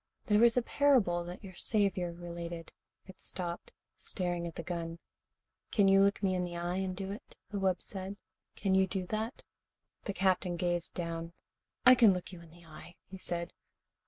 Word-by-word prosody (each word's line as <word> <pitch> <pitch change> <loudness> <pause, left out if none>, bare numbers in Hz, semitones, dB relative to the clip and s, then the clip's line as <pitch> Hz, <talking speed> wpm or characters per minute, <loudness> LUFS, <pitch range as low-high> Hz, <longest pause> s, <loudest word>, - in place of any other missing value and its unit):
There 210 -1 +4
was 235 +1 +5
a 250 - +4
parable 235 -13 +3
that 175 +4 -8
your 190 -2 -9
Saviour 190 -3 +1
related 170 -1 -7 0.2
" - - -54
It 190 - -13
stopped, 175 -1 -5 0.2
staring 175 -2 -2
at 165 - -8
the 170 - -5
gun. 165 -1 -4 0.7
"Can 205 -3 +4
you 195 0 +6
look 200 +1 +3
me 190 -1 +3
in 180 -1 0
the 175 -1 -4
eye 175 +1 -2
and 190 -1 -2
do 195 0 -4
it?" 205 - -9 0.2
the 205 - -2
wub 190 -2 +1
said. 195 0 -6 0.4
"Can 195 -2 0
you 190 0 +4
do 190 -1 -2
that?" 220 - -3 0.6
The 200 - -2
Captain 185 -2 +1
gazed 175 -1 -1
down. 165 -1 -4 0.5
"I 255 - +11
can 230 -5 +7
look 180 - -5
you 175 - -9
in 170 - -14
the 170 +1 -17
eye," 165 +2 -12 0.2
he 190 - -8
said. 170 -1 -3
185 Hz, 190 wpm, -32 LUFS, 175-195 Hz, 0.7 s, I